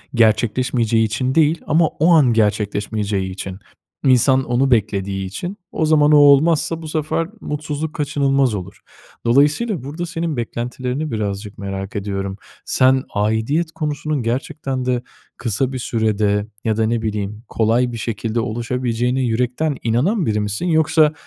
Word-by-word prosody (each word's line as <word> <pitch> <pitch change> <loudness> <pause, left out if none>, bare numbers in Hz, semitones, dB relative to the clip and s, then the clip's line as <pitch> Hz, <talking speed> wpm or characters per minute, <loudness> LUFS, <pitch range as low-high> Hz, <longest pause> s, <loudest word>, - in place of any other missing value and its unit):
gerçekleşmeyeceği 115 0 +2
için 125 +5 -1
değil 160 0 +3
ama 160 +2 +4
o 160 +3 +2
an 140 -7 +5
gerçekleşmeyeceği 105 -2 0
için, 95 0 -6 0.5
insan 130 +1 +4
onu 130 +2 +1
beklediği 100 -3 0
için, 175 - -5
o 160 - 0
zaman 150 -1 +4
o 150 - +7
olmazsa 150 +3 +4
bu 160 - -7
sefer 155 +1 -1
mutsuzluk 150 +1 -4
kaçınılmaz 140 -4 +1
olur. 95 -1 -8 0.4
Dolayısıyla 150 - +2
burada 155 +6 -5
senin 165 -3 -3
beklentilerini 125 +5 -3
birazcık 105 -2 -4
merak 95 -1 -5
ediyorum. 100 -1 -3 0.3
Sen 130 0 +3
aidiyet 110 +11 0
konusunun 150 -3 -2
gerçekten 130 +2 -3
de 125 -1 0 0.4
kısa 125 +3 -1
bir 130 - -3
sürede 105 -3 0 0.2
ya 110 -1 0
da 110 - +2
ne 115 +1 0
bileyim 105 0 -3
kolay 115 +3 +1
bir 115 - -5
şekilde 115 0 -2
oluşabileceğine 120 +2 -1
yürekten 125 +5 0
inanan 155 - +1
biri 105 -3 0
misin 105 - -2
yoksa, 155 -1 +3
125 Hz, 140 wpm, -20 LUFS, 110-150 Hz, 0.5 s, o